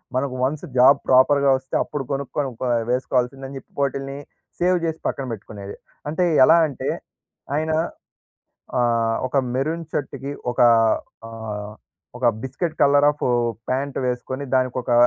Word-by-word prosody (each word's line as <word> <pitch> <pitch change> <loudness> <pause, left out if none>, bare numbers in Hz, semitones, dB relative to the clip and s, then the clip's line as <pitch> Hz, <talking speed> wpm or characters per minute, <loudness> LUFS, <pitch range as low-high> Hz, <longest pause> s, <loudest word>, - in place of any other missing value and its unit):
మనకు 130 0 -1
once 140 +5 -1
job 135 +3 +7
ప్రాపర్‌గా 140 +2 +5
వస్తే, 130 0 -7
అప్పుడు 145 - -4
కొనుక్కొని 140 0 -2
ప - - -1 0.3
వేసుకోవాల్సిందని 130 +1 -1
చెప్పి, - - -24
వాటిల్ని 135 0 -2 0.4
సేవ్ 180 +1 +3
చేసి 160 -1 -2
పక్కన 135 - -2
పెట్టుకునేది. 100 -1 -8 0.3
అంటే 160 +4 0 0.2
ఎలా 170 - +6
అంటే 135 - -4 0.7
ఆయన 160 +1 -1 1.1
ఆహ్, 115 -2 +2
ఒక 130 - -3 0.2
మెరూన్ 160 +6 -1
షర్ట్‌కి 140 0 -4 0.2
ఒక - - -3 0.7
ఆహ్, 105 -2 -6 0.5
ఒక 125 0 0 0.2
బిస్కెట్ 155 +5 -3
కలర్ 145 0 +5
ఆఫ్ 145 - -6 0.4
ప్యాంట్ 135 +2 -1
వేసుకొని 125 +2 -3
దానికొక 130 -1 0
135 Hz, 125 wpm, -22 LUFS, 125-140 Hz, 1.1 s, job